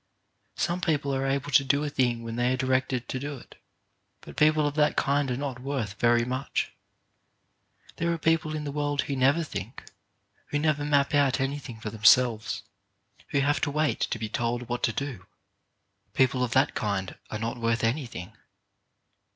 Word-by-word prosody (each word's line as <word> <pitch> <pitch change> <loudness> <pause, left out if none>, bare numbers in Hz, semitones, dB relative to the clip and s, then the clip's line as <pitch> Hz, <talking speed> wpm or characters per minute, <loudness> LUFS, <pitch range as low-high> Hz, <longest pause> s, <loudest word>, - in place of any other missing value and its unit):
Some 175 +1 -1
people 145 -4 0
are 135 0 0
able 140 +1 -1
to 135 - +6
do 140 +2 +1
a 150 - -1
thing 120 -4 +1
when 115 0 -5
they 120 +1 +1
are - - -1
directed 130 -1 0
to 130 - -3
do 145 +1 -5
it, - - -16 0.6
but - - -12
people 155 0 +4
of 145 - 0
that 150 0 +2
kind 140 0 +1
are 125 - -1
not 135 -3 -4
worth 125 -7 -4
very 120 0 +4
much. 130 +2 -2 1.3
There 170 +1 0
are 170 - 0
people 160 -1 +1
in 150 - -3
the 145 - -4
world 145 -1 0
who 140 - -3
never 135 +6 +3
think, 120 - -7 0.6
who 145 - -1
never 150 -1 +1
map 145 -1 +2
out 140 -2 +3
any 135 +2 -1
thing 120 -5 -9
for 110 -1 -5
themselves, 110 +1 +4 0.6
who 140 - +1
have 145 +2 +1
to 145 - +1
wait 150 +1 0
to - - -1
be 110 0 -3
told 120 +2 -1
what 120 0 -3
to 115 - 0
do. 115 -7 -5 0.9
People 130 -1 +3
of 120 -2 -1
that 135 +3 +3
kind 100 -3 -2
are 110 - -3
not 115 +2 -3
worth 115 0 0
anything. 115 - -2
135 Hz, 185 wpm, -27 LUFS, 120-145 Hz, 1.3 s, to